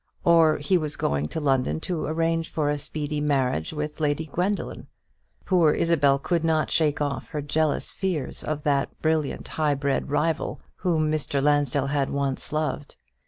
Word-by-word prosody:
Or 165 -2 +5
he 175 +5 +2
was 155 -1 -3
going 70 +1 -1
to 160 - -4
London 130 - +1
to 175 -3 -2
arrange 165 +1 0
for 150 -2 0
a 145 - -2
speedy 150 0 -2
marriage 130 - 0
with 150 0 -4
Lady 150 +1 0
Gwendoline. 180 +7 -2 0.6
Poor 170 -5 +4
Isabel 145 -5 +3
could 165 +4 -1
not 160 -1 +1
shake 155 -1 +2
off 145 -1 -2
her 150 -2 -3
jealous 155 +1 0
fears 175 -9 -3
of 150 -1 -3
that 140 -2 0
brilliant 155 -2 0
high 150 -2 0
bred 140 +1 -1
rival, 160 +3 0 0.2
whom 160 -4 +1
Mr. 145 -2 -1
Lansdell 145 -1 +2
had 140 -1 0
once 140 -1 -2
loved. 150 -1 -2
150 Hz, 165 wpm, -25 LUFS, 140-160 Hz, 0.6 s, Or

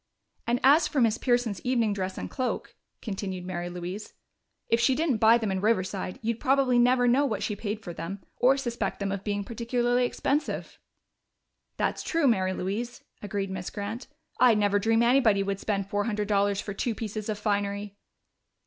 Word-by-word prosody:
"And 240 +1 +2
as 300 +4 +6
for 295 - -1
Miss 230 -2 +3
Pearson's 240 -6 +1
evening 235 -4 +1
dress 190 -1 -3
and - - -4
cloak," 255 -2 -3 0.3
continued 190 -4 -4
Mary 175 -1 -4
Louise, 180 +4 -6 0.5
"if 230 - +2
she 255 +2 +3
didn't 305 -5 +1
buy 225 +2 +6
them 220 -4 -2
in 190 -1 -1
Riverside, 195 -3 0
you'd 230 +1 -1
probably 265 -2 +3
never 245 0 +4
know 255 +4 +4
what 225 -7 -1
she 210 - -1
paid 210 +1 -4
for 175 - -6
them, 170 +4 -6
or 265 +2 +4
suspect 240 -3 -3
them 200 -1 -2
of 200 0 -4
being 205 -1 -2
particularly 240 +2 0
expensive." 290 +4 -2 1.0
"That's - - -1
true, 330 -3 0
Mary 190 -6 +2
Louise," 220 +7 -4 0.2
agreed 200 -1 -3
Miss 185 -1 -4
Grant. 215 +4 -5 0.3
"I'd 245 -3 +6
never 205 -1 +2
dream 225 +3 +3
anybody 235 -5 +4
would 195 0 -2
spend 200 -2 -2
four 205 +1 -1
hundred 210 -2 -1
dollars 200 -1 +2
for 200 - -4
two 225 +3 -2
pieces 215 0 -5
of 210 - -1
finery." 205 -1 -2
215 Hz, 180 wpm, -27 LUFS, 200-245 Hz, 1.0 s, as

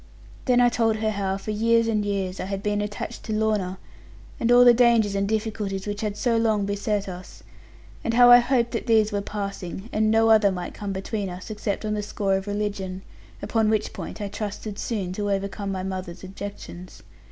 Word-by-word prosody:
Then 250 -2 +4
I 245 0 +6
told 225 -2 +1
her 215 0 -1
how, 195 -2 -1
for 200 +2 -5
years 230 +2 +2
and 215 -2 +1
years, 195 -2 -2
I - - -3
had 195 0 -4
been 205 0 0
attached 205 0 -5
to 220 - -3
Lorna, 210 -4 0 0.6
and 235 - +1
all 245 0 +8
the 240 - +9
dangers 235 -4 +4
and 200 0 0
difficulties 210 -3 -2
which 205 0 -4
had 210 -1 -3
so 230 +2 +1
long 220 -3 +2
beset 205 0 -1
us, 180 -1 -9 0.6
and 230 - -1
how 245 0 +8
I 245 - +10
hoped 240 -1 +1
that 230 - -3
these 220 -2 +4
were 205 -1 -1
passing, 200 0 -5
and 215 0 +2
no 225 0 +4
other 210 -2 +5
might 180 -1 -5
come 205 -1 -5
between 195 +1 -3
us, 180 +4 -8
except 210 0 -3
on 215 - -1
the 210 - -1
score 205 -1 -1
of 190 +1 -3
religion; 200 -2 -3 0.4
upon 220 -2 +1
which 215 -1 0
point - - -7
I 205 - -3
trusted 205 0 -5
soon 195 -6 -3
to 205 +1 -2
overcome 200 0 -2
my 190 -1 -3
mother's 185 -2 -5
objections. 190 -2 -9
205 Hz, 205 wpm, -24 LUFS, 195-220 Hz, 0.6 s, I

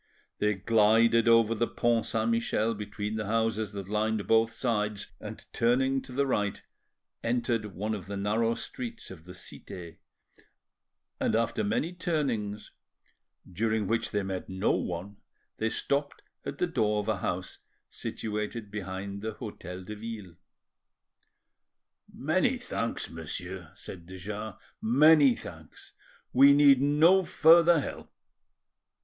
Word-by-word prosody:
They 105 0 +2
glided 115 +3 +4
over 115 -1 +5
the 115 +1 0
Pont 120 -1 +1
Saint 115 +1 0
Michel 115 -1 +1
between 105 0 -4
the 105 -2 -3
houses 110 -1 0
that 100 -2 -6
lined 105 0 0
both 115 0 +4
sides, 105 -3 -2
and, - - -9
turning 130 +3 +2
to 130 - -12
the 140 +2 +1
right, 105 -6 0 0.6
entered 115 -3 -1
one 105 +4 -2
of 95 -4 -6
the 100 0 -4
narrow 110 +3 +1
streets 235 - -7
of 85 -3 -12
the 90 +1 -10
Cite, 85 -2 -9 1.2
and - - +1
after 115 -1 0
many 115 - -1
turnings, 125 -12 -2 0.8
during 110 +3 0
which 115 +3 0
they 105 -1 -1
met 95 -1 -4
no 95 +2 +1
one, 90 +4 -3 0.4
they 110 - 0
stopped 140 +4 -2 0.2
at - - -5
the - - +1
door 105 -1 +1
of 105 - -9
a 110 -2 +1
house 90 0 -4 0.3
situated 105 0 -4
behind 100 0 -5
the 110 +1 -4
Hotel 90 -2 -8
de 105 +3 -7
Ville. 105 -5 -8 1.8
"Many 185 - +1
thanks, 115 - -3
monsieur," 85 +2 -6
said 85 -4 -10
de 95 +1 -9
Jars,—"many 115 - +3
thanks; - - -11 0.4
we 140 +2 +8
need 140 -2 +6
no 155 +7 +5
further 170 0 +6
help." - - -6
110 Hz, 130 wpm, -29 LUFS, 100-120 Hz, 1.8 s, we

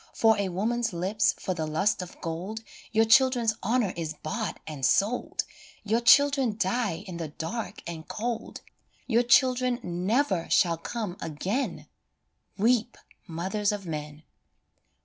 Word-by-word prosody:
For 225 -1 +5
a 200 -2 0
woman's 225 +4 -1
lips, 190 +5 +1
for 185 - -2
the 160 -3 -3
lust 190 +6 +1
of 180 - -9
gold, 185 +7 -5 0.3
Your 225 0 +4
children's 240 -1 +4
honour 225 -3 +1
is 160 -2 -4
bought 210 +2 -3
and 150 -4 -7
sold, 210 - +1 0.4
Your 220 +3 +1
children 275 -2 +5
die 200 -3 -1
in 180 -4 -7
the 165 -2 -4
dark 200 +8 -5
and 165 -2 -7
cold, 230 +1 -4 0.4
Your 235 -1 +3
children 250 0 +3
never 185 +2 0
shall 170 -3 +3
come 195 +1 -5
again 190 - -3 0.7
Weep, 235 +2 +2 0.3
mothers 190 +5 -1
of 205 -2 -5
men 150 -1 -6
205 Hz, 135 wpm, -27 LUFS, 170-235 Hz, 0.7 s, For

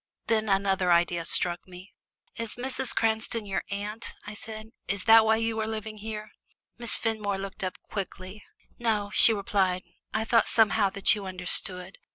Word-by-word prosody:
Then 220 -1 0
another 195 -2 +2
idea 170 -1 +2
struck 175 0 +1
me. 185 +2 -13 0.4
"Is 230 -2 -2
Mrs. 260 0 -2
Cranston 220 0 0
your 195 -1 -2
aunt?" 205 +3 -5
I 210 - -7
said. 215 +1 -8 0.2
"Is 200 0 -2
that 225 0 +7
why 220 0 +4
you 225 0 -1
are 220 - -1
living 215 -1 -5
here?" 215 0 -6 0.5
Miss 235 -1 +5
Fenmore 215 -3 -2
looked 195 0 -6
up 185 - -3
quickly. 190 0 -6 0.4
"No," 215 -4 -1
she 225 - +8
replied; 195 -3 0 0.3
"I 220 0 -1
thought 230 0 +3
somehow 220 -2 +3
that 195 0 +4
you 205 -3 -5
understood. 180 0 -2
210 Hz, 165 wpm, -27 LUFS, 190-220 Hz, 0.5 s, she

